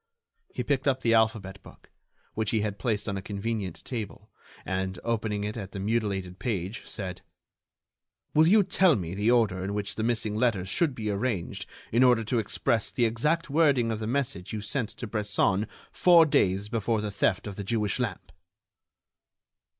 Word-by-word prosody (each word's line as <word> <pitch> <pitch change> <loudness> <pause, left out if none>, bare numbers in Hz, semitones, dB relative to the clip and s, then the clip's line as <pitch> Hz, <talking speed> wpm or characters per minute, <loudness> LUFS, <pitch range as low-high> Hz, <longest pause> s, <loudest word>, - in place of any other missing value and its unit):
He - - -1
picked 140 -1 0
up 130 -1 +2
the 115 -2 +3
alphabet 110 -4 +1
book, - - -17 0.4
which 110 -1 -1
he 110 - +1
had 100 -1 -3
placed 110 +1 -1
on 100 -2 -2
a - - -4
convenient 100 -2 -4
table, 115 -6 -6 0.3
and, 95 0 -2
opening 110 -3 -1
it 105 +1 -3
at 100 -4 -7
the 100 - -5
mutilated 100 -4 -1
page, 100 -2 -3
said: 95 -3 -5 1.1
"Will 155 +1 +5
you 210 +3 +6
tell 185 -3 +4
me 90 -4 -4
the 105 +3 +1
order 110 -6 +3
in 100 +2 -3
which 100 -1 -3
the - - -4
missing 115 -2 0
letters 110 -5 +1
should 145 - +1
be 110 -3 -2
arranged 100 -3 -2 0.2
in 120 +3 +4
order 125 -3 +5
to 115 +2 0
express 110 +1 0
the 120 - +1
exact 150 +9 0
wording 140 -7 +3
of 110 - -2
the 110 - -3
message 115 -8 -2
you 110 - -2
sent 110 +2 -2
to 125 - -7
Bresson 105 -1 0 0.2
four 170 -2 +6
days 100 -8 +2
before 115 0 0
the 105 -1 -3
theft 95 -1 +1
of 100 -2 -6
the 100 - -5
Jewish 105 +1 -1
lamp?" 95 -7 -3
110 Hz, 180 wpm, -28 LUFS, 100-120 Hz, 1.1 s, you